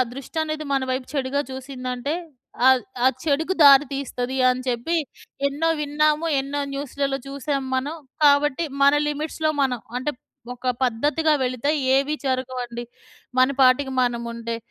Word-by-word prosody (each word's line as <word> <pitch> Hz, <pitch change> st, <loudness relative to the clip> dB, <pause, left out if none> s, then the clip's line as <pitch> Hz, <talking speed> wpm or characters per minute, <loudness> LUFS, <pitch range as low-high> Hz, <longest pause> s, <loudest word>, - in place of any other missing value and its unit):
దృష్టనేది 310 Hz, +3 st, -4 dB
మన 270 Hz, -, +1 dB
వైపు 255 Hz, 0 st, -3 dB
చెడుగా 280 Hz, 0 st, 0 dB
చూసిందంటే 260 Hz, +1 st, -4 dB, 0.5 s
ఆహ్, 260 Hz, -1 st, +6 dB, 0.2 s
ఆ -, -, +6 dB, 0.2 s
చెడుకి 320 Hz, +5 st, +1 dB
దారి 280 Hz, 0 st, +8 dB
తీస్తది 260 Hz, -2 st, -3 dB
అని 250 Hz, 0 st, +1 dB
చెప్పి 250 Hz, +8 st, -1 dB, 0.5 s
ఎన్నో 295 Hz, +4 st, 0 dB
విన్నాము. 305 Hz, +2 st, +1 dB
ఎన్నో 280 Hz, +1 st, -3 dB
న్యూస్‌లలో 275 Hz, 0 st, -2 dB
చూసాం 280 Hz, 0 st, -2 dB
మనం. 285 Hz, +5 st, -2 dB, 0.3 s
కాబట్టి 290 Hz, +2 st, +4 dB, 0.2 s
మన 280 Hz, -, +7 dB, 0.2 s
లిమిట్స్‌లో 310 Hz, +1 st, -1 dB
మనం. 255 Hz, -2 st, 0 dB, 0.2 s
అంటే 260 Hz, +4 st, -1 dB, 0.4 s
ఒక 250 Hz, +1 st, -4 dB
పద్ధతిగా 295 Hz, +6 st, +1 dB
వెళితే 255 Hz, +2 st, 0 dB, 0.2 s
ఏవి 275 Hz, +2 st, +2 dB
జరగవండి. 250 Hz, -2 st, -3 dB, 0.5 s
మన 255 Hz, +1 st, +5 dB
పాటికి 265 Hz, +1 st, +4 dB
మనం 240 Hz, -1 st, 0 dB
ఉంటె. 230 Hz, 0 st, -4 dB
275 Hz, 130 wpm, -23 LUFS, 255-295 Hz, 0.5 s, దారి